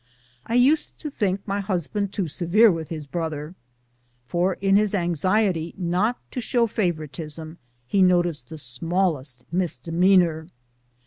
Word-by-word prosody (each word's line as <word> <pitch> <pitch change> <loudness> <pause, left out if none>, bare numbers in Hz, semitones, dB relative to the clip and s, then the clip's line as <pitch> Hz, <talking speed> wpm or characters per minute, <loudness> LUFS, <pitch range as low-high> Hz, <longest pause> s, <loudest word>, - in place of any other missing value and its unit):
I 230 - -1
used 275 +6 +3
to 300 - -5
think 195 -6 -1
my 200 0 -1
husband 195 +1 -2
too 195 -3 -2
severe 185 +8 +4
with 165 -2 -4
his 155 -3 -5
brother, 155 +1 -4 0.7
for 175 +6 0
in 195 0 +2
his 210 0 +3
anxiety 175 0 0
not 185 +6 0
to 250 - -3
show 235 +1 +2
favoritism 160 -5 -4 0.3
he 195 +10 +1
noticed 175 -8 +2
the 160 - -8
smallest 145 -1 -2
misdemeanor. 170 0 +2
175 Hz, 130 wpm, -24 LUFS, 160-200 Hz, 0.7 s, severe